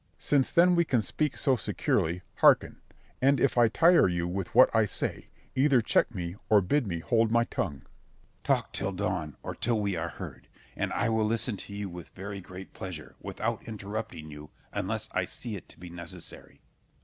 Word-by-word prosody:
Since 140 Hz, -3 st, +2 dB
then 180 Hz, +1 st, +5 dB
we 170 Hz, -1 st, +4 dB
can 125 Hz, -8 st, +1 dB
speak 150 Hz, +7 st, -1 dB
so 135 Hz, -3 st, +3 dB
securely, 90 Hz, -5 st, -1 dB
hearken; -, -, +4 dB, 0.4 s
and 135 Hz, +1 st, +4 dB
if 140 Hz, -, +2 dB
I 120 Hz, -1 st, +6 dB
tire 170 Hz, -, +5 dB
you 85 Hz, -1 st, -1 dB
with 90 Hz, +2 st, -4 dB
what 125 Hz, -1 st, +7 dB
I 110 Hz, -1 st, +5 dB
say, -, -, -4 dB, 0.3 s
either 135 Hz, -1 st, +4 dB
check 115 Hz, +1 st, +1 dB
me 85 Hz, 0 st, -4 dB
or 105 Hz, -, +7 dB
bid 115 Hz, +7 st, +1 dB
me 85 Hz, -3 st, -3 dB
hold 115 Hz, +4 st, +2 dB
my 115 Hz, +1 st, +4 dB
tongue. 75 Hz, -11 st, -3 dB
Scip. -, -, -33 dB
Talk -, -, +1 dB
till 100 Hz, 0 st, -1 dB
dawn, 90 Hz, -6 st, -2 dB
or -, -, -4 dB
till 115 Hz, -2 st, 0 dB
we 100 Hz, -2 st, 0 dB
are 85 Hz, +1 st, -2 dB
heard, -, -, -9 dB, 0.3 s
and -, -, -2 dB
I 120 Hz, -, +1 dB
will 110 Hz, -1 st, +2 dB
listen 115 Hz, +1 st, 0 dB
to 100 Hz, -, -8 dB
you 100 Hz, -1 st, -3 dB
with 85 Hz, -2 st, -9 dB
very 100 Hz, +1 st, -6 dB
great 90 Hz, +1 st, -10 dB
pleasure, 90 Hz, -5 st, -8 dB
without -, -, -3 dB
interrupting 105 Hz, -7 st, -6 dB
you, 75 Hz, +1 st, -10 dB, 0.2 s
unless -, -, -2 dB
I -, -, 0 dB
see 115 Hz, -3 st, -5 dB
it 95 Hz, -, -10 dB
to -, -, -14 dB
be 90 Hz, 0 st, -9 dB
necessary. 85 Hz, 0 st, -7 dB
100 Hz, 195 wpm, -29 LUFS, 90-120 Hz, 0.4 s, what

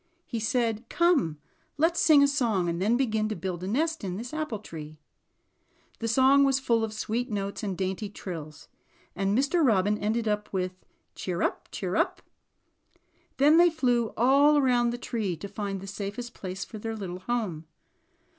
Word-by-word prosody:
He 230 Hz, -, -4 dB
said: 225 Hz, 0 st, -1 dB
''Come 305 Hz, -, +2 dB, 0.4 s
let's 330 Hz, +3 st, +2 dB
sing 295 Hz, -3 st, +6 dB
a -, -, +5 dB
song, 230 Hz, -10 st, +1 dB
and 170 Hz, +1 st, -2 dB
then 220 Hz, +5 st, +3 dB
begin 220 Hz, -4 st, 0 dB
to 215 Hz, -, -2 dB
build 180 Hz, -3 st, -4 dB
a -, -, -3 dB
nest 315 Hz, +8 st, 0 dB
in 185 Hz, -2 st, -3 dB
this 240 Hz, +5 st, -7 dB
apple 310 Hz, -8 st, -2 dB
tree." 155 Hz, -6 st, -9 dB, 1.0 s
The 230 Hz, -, -2 dB
song 265 Hz, +4 st, +5 dB
was 270 Hz, -1 st, +3 dB
full 230 Hz, -3 st, +1 dB
of 220 Hz, -, -2 dB
sweet 225 Hz, +3 st, -2 dB
notes 200 Hz, -2 st, -3 dB
and 195 Hz, -4 st, -3 dB
dainty 190 Hz, +2 st, -2 dB
trills, 160 Hz, -7 st, -8 dB, 0.5 s
and 195 Hz, +3 st, +1 dB
Mr. 285 Hz, +6 st, +2 dB
Robin 210 Hz, -4 st, +3 dB
ended 220 Hz, +2 st, -1 dB, 0.2 s
with 185 Hz, -1 st, -1 dB, 0.4 s
"cheer 175 Hz, -2 st, -3 dB
up, -, -, -2 dB
cheer 185 Hz, -1 st, -3 dB
up." -, -, 0 dB, 1.1 s
Then 295 Hz, +4 st, +6 dB
they 350 Hz, +1 st, +7 dB
flew 245 Hz, -7 st, +1 dB
all 280 Hz, +5 st, +5 dB
around 245 Hz, -4 st, +3 dB
the 240 Hz, -, -3 dB
tree 215 Hz, -8 st, -3 dB
to 200 Hz, -, -7 dB
find 200 Hz, -1 st, -4 dB
the -, -, -8 dB
safest 200 Hz, +4 st, -5 dB
place 190 Hz, 0 st, -6 dB
for 215 Hz, -, -9 dB
their 225 Hz, +1 st, -4 dB
little 185 Hz, -4 st, -6 dB
home. 185 Hz, -7 st, -3 dB
220 Hz, 175 wpm, -27 LUFS, 195-260 Hz, 1.1 s, they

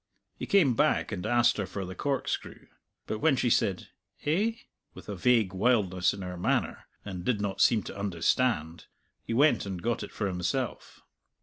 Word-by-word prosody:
He -, -, -6 dB
came 170 Hz, -11 st, +4 dB
back 150 Hz, 0 st, +1 dB
and 95 Hz, -4 st, -4 dB
asked 120 Hz, +1 st, +3 dB
her 100 Hz, -3 st, -2 dB
for 100 Hz, -2 st, -5 dB
the 90 Hz, -, -7 dB
corkscrew, 135 Hz, +6 st, -3 dB, 0.4 s
but 110 Hz, -, -4 dB
when 155 Hz, -2 st, +3 dB
she 125 Hz, -2 st, +1 dB
said 95 Hz, -4 st, +1 dB, 0.4 s
"Eh?" 195 Hz, +10 st, +1 dB, 0.4 s
with -, -, -12 dB
a 105 Hz, -, -4 dB
vague 110 Hz, -1 st, +2 dB
wildness 95 Hz, -4 st, +2 dB
in 100 Hz, -1 st, -7 dB
her 90 Hz, -1 st, -6 dB
manner, 85 Hz, -, -1 dB, 0.2 s
and 95 Hz, -3 st, -6 dB
did 115 Hz, -1 st, 0 dB
not 100 Hz, -2 st, -2 dB
seem 110 Hz, -3 st, +4 dB
to -, -, -8 dB
understand, 90 Hz, -2 st, 0 dB, 0.3 s
he 115 Hz, -, -4 dB
went 135 Hz, -5 st, +3 dB
and 95 Hz, -2 st, -4 dB
got 115 Hz, +6 st, -1 dB
it -, -, -7 dB
for 105 Hz, -, -3 dB
himself. 100 Hz, +7 st, -3 dB
105 Hz, 180 wpm, -28 LUFS, 95-125 Hz, 0.4 s, came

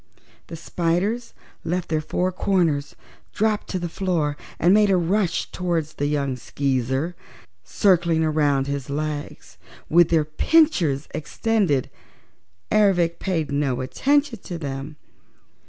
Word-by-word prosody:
The -, -, -7 dB
spiders 180 Hz, +8 st, -1 dB, 0.3 s
left 180 Hz, +1 st, -2 dB
their 155 Hz, -1 st, 0 dB
four 180 Hz, +4 st, -1 dB
corners, 170 Hz, -7 st, 0 dB, 0.4 s
dropped 215 Hz, 0 st, 0 dB
to 185 Hz, -, -3 dB
the 175 Hz, -1 st, -3 dB
floor 165 Hz, -5 st, -1 dB, 0.2 s
and 175 Hz, +3 st, +4 dB
made 210 Hz, 0 st, +5 dB
a 190 Hz, -, +4 dB
rush 180 Hz, +1 st, 0 dB
toward 175 Hz, -3 st, -1 dB
the 145 Hz, -1 st, -4 dB
young 140 Hz, -3 st, -1 dB
Skeezer, 130 Hz, +5 st, -1 dB, 0.5 s
circling 170 Hz, -, +2 dB
around 145 Hz, -3 st, +2 dB
his 140 Hz, -2 st, -4 dB
legs 150 Hz, 0 st, -5 dB, 0.3 s
with 170 Hz, 0 st, +5 dB
their 160 Hz, -3 st, +3 dB
pinchers 160 Hz, -, +2 dB
extended. 190 Hz, -, 0 dB, 0.8 s
Ervic 175 Hz, -5 st, +3 dB
paid 165 Hz, -6 st, -2 dB
no 140 Hz, -3 st, 0 dB
attention 280 Hz, -, +1 dB
to 175 Hz, -2 st, -7 dB
them. 140 Hz, -1 st, -6 dB
165 Hz, 120 wpm, -23 LUFS, 145-185 Hz, 0.8 s, made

